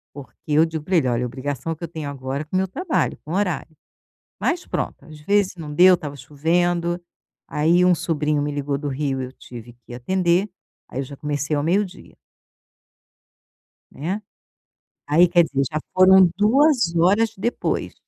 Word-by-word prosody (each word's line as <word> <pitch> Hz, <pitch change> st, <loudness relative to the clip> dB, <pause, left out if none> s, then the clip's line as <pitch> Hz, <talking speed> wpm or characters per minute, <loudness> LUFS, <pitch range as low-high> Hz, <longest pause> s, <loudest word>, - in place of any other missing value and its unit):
Porque 140 Hz, -3 st, -11 dB
eu 155 Hz, +2 st, +4 dB
digo 160 Hz, -2 st, -5 dB
para 185 Hz, +4 st, -1 dB
ele: 135 Hz, -5 st, +2 dB
"Olha, 120 Hz, 0 st, 0 dB
obrigação 140 Hz, +5 st, -4 dB
que 165 Hz, -, -12 dB
eu -, -, -3 dB
tenho 155 Hz, -3 st, -6 dB
agora 135 Hz, +1 st, -4 dB
com 170 Hz, -, -6 dB
o -, -, +4 dB
meu 190 Hz, 0 st, +1 dB
trabalho, 345 Hz, -, -1 dB
com 155 Hz, -, -6 dB
horário". 180 Hz, -5 st, -2 dB, 0.7 s
Mas 355 Hz, +1 st, -1 dB
pronto, -, -, -4 dB
às 155 Hz, -1 st, -12 dB
vezes 200 Hz, +3 st, +1 dB
não 155 Hz, -3 st, -7 dB
deu, 180 Hz, +4 st, +7 dB
estava 145 Hz, -5 st, -5 dB
chovendo. 170 Hz, +4 st, 0 dB, 0.5 s
Aí 170 Hz, +4 st, +3 dB
um 180 Hz, -, +5 dB
sobrinho 150 Hz, -3 st, -1 dB
me 145 Hz, 0 st, -2 dB
ligou 145 Hz, -1 st, -2 dB
do 145 Hz, 0 st, -4 dB
Rio. 135 Hz, -1 st, -2 dB
Eu 130 Hz, 0 st, -7 dB
tive 120 Hz, -2 st, -11 dB
que 120 Hz, -, -9 dB
atender. 180 Hz, -, +1 dB, 0.4 s
Aí -, -, -7 dB
eu -, -, -3 dB
já 140 Hz, +2 st, -10 dB
comecei 145 Hz, +1 st, -2 dB
ao 145 Hz, -, 0 dB
meio-dia. 185 Hz, +4 st, -2 dB, 1.8 s
Né. 180 Hz, +9 st, -4 dB, 0.9 s
Aí 165 Hz, +5 st, +5 dB
quer 175 Hz, 0 st, +4 dB
dizer, 135 Hz, -3 st, -1 dB
já 155 Hz, -, -1 dB, 0.2 s
foram 185 Hz, 0 st, +7 dB
2 240 Hz, -, +3 dB
horas 200 Hz, +7 st, +3 dB
depois. 235 Hz, +5 st, -2 dB
160 Hz, 170 wpm, -22 LUFS, 145-185 Hz, 1.8 s, deu